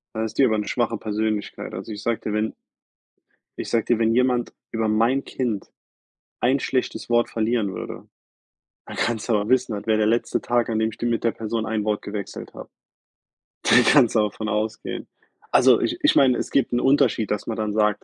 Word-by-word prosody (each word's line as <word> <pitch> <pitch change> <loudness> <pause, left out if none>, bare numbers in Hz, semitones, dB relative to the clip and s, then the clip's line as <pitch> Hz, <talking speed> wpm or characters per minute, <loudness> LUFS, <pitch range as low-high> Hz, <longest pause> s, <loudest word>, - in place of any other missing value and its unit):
Dann 110 - -1
ist 110 - -5
die 135 - +6
aber 110 -3 +2
'ne 105 - -2
schwache 120 -2 -1
Persönlichkeit. 110 -2 -3
Also, 95 +4 -6
ich 105 - -6
sage 115 0 -1
dir, 105 - -4
wenn 105 +1 -1 1.0
Iich - - -5
sage 115 -2 +1
dir, 120 -2 +1
wenn 115 0 +2
jemand 125 -1 +1 0.2
über 115 -1 -1
mein 115 +6 +2
Kind 115 -6 -3 0.7
ein 130 +3 +2
schlechtes 130 -2 -2
Wort 120 0 +2
verlieren 110 -3 0
würde, - - -7 0.8
dann - - -9
kannst 120 0 -1
du - - +3
aber 105 0 0
wissen, 125 -3 +2
das 105 - -6
wäre 110 - +3
der 110 0 +2
letzte 115 +2 0
Tag, 120 -1 0
an 110 -1 0
dem 110 - +1
ich 110 - -11
d - - -3
mit 120 -1 0
der 115 - +2
Person 110 0 -3
ein 110 -1 -1
Wort 105 -1 0
gewechselt 100 -1 -7
habe. - - -10 0.9
Da - - +4
kannst 120 -1 +5
du - - +5
aber 105 -2 +1
von 110 +2 -5
ausgehen. 110 +1 -3 0.4
Also, - - +6
ich - - -1
ich - - +4
meine, 130 -3 +5
es - - -3
gibt 135 -3 +1
'n 120 - +2
Unterschied, 135 -6 +2
dass 105 - -2
man 115 - -3
dann 105 -1 -2
sagt, 105 -1 +1
110 Hz, 215 wpm, -23 LUFS, 105-120 Hz, 1.0 s, die